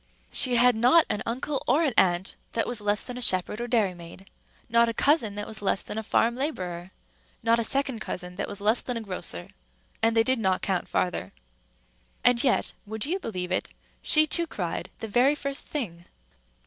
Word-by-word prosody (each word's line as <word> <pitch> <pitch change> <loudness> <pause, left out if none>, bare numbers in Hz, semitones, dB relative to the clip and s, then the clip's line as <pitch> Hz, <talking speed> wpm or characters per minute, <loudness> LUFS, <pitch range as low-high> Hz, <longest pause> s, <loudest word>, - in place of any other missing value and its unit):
She 250 -2 +5
had 245 0 +5
not 250 +9 +5
an 210 - -2
uncle 260 +4 -2
or 285 +7 +3
an 280 -6 +1
aunt 180 0 +3 0.2
that 225 - 0
was 240 -3 -3
less 205 0 0
than 250 -1 -7
a - - -7
shepherd 190 +1 +2
or 240 - -3
dairymaid, 190 -5 -2 0.4
not 235 0 +3
a 230 - -4
cousin, 255 -8 +2
that 205 0 -3
was 215 -1 -6
less 195 -1 0
than 220 - -5
a - - -3
farm 230 +2 +1
laborer, 185 - -4 0.5
not 230 +1 +3
a - - 0
second 270 0 0
cousin 180 -3 -6
that 200 +2 -4
was 205 - -6
less 215 +4 +2
than 250 -2 -4
a - - -4
grocer, 180 - -5 0.5
and 225 0 +2
they 225 - +6
did 260 +1 +1
not 190 -3 0
count 190 -3 -1
farther. 175 - -2 0.9
And 245 -1 +4
yet 260 - +2
(would 220 +2 -3
you 360 +6 -1
believe 185 - -5
it?) - - -1 0.3
she 310 0 +5
too 335 +2 0
cried 175 - -4
the 225 - -4
very 250 +7 +3
first 280 -1 -4
thing. 175 - -5
225 Hz, 200 wpm, -26 LUFS, 190-250 Hz, 0.9 s, they